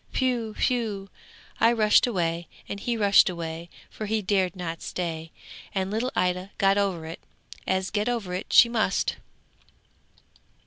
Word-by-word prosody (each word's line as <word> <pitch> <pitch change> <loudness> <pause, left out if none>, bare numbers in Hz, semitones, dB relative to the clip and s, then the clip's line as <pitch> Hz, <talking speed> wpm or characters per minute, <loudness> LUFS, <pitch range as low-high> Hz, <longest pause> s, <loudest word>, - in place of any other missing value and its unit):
Whew! 240 -4 0
whew! 215 -6 -1 0.5
I 230 - +5
rushed 215 0 +4
away, 170 -6 -1 0.2
and 200 - -5
he 235 +3 -2
rushed 200 -2 +5
away, 170 -1 -5 0.2
for 215 - -6
he 215 0 0
dared 190 -2 +1
not 165 -3 -5
stay, 165 -2 -4 0.4
and 190 0 -1
little 235 +4 -1
Ida 180 +1 0
got 195 +1 +3
over 185 -5 -1
it, 160 +1 -7 0.5
as 190 0 0
get 210 +2 0
over 220 -7 -2
it 185 +3 -5
she 240 - +8
must. 225 -4 0
195 Hz, 145 wpm, -26 LUFS, 180-220 Hz, 0.5 s, she